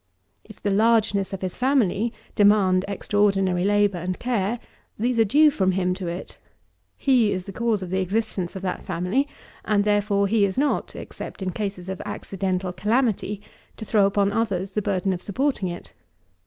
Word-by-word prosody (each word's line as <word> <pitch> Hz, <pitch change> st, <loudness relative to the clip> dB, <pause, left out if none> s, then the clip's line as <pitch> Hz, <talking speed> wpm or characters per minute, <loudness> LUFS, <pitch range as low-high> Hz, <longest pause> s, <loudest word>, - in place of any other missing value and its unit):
If 215 Hz, -, -14 dB
the 205 Hz, -, -1 dB
largeness 210 Hz, -2 st, +2 dB
of 195 Hz, -, -5 dB
his 185 Hz, -, -2 dB
family 240 Hz, -4 st, +1 dB, 0.2 s
demand 200 Hz, -3 st, +4 dB
extraordinary 195 Hz, -3 st, +1 dB
labour 205 Hz, -2 st, +2 dB
and 180 Hz, +1 st, -3 dB
care, 235 Hz, -2 st, -1 dB, 0.4 s
these 240 Hz, +2 st, 0 dB
are -, -, +7 dB
due 295 Hz, +8 st, +5 dB
from 190 Hz, -7 st, +1 dB
him 180 Hz, -1 st, +1 dB
to 185 Hz, -1 st, -5 dB
it. 170 Hz, +2 st, -6 dB, 0.6 s
He 245 Hz, -6 st, +3 dB
is 185 Hz, -1 st, -3 dB
the 195 Hz, -, -7 dB
cause 225 Hz, -2 st, 0 dB
of 180 Hz, -, -7 dB
the 190 Hz, -, +1 dB
existence 190 Hz, -2 st, -2 dB
of 190 Hz, -, -6 dB
that 185 Hz, -, -3 dB
family; 185 Hz, +12 st, 0 dB, 0.4 s
and, 205 Hz, -1 st, +2 dB
therefore, 205 Hz, -1 st, +2 dB
he 210 Hz, +1 st, +2 dB
is 195 Hz, +2 st, 0 dB
not, 285 Hz, +2 st, 0 dB
except -, -, -7 dB
in 185 Hz, -, -2 dB
cases 190 Hz, 0 st, -4 dB
of 190 Hz, -1 st, -5 dB
accidental 190 Hz, -1 st, -3 dB
calamity, 210 Hz, -2 st, 0 dB, 0.3 s
to 220 Hz, -, -7 dB
throw 205 Hz, -2 st, +3 dB
upon 200 Hz, 0 st, +1 dB
others 200 Hz, -4 st, -1 dB
the 210 Hz, -, -1 dB
burden 195 Hz, -1 st, 0 dB
of 180 Hz, -, -5 dB
supporting 235 Hz, 0 st, -1 dB
it. 175 Hz, 0 st, -8 dB
200 Hz, 175 wpm, -24 LUFS, 185-220 Hz, 0.6 s, are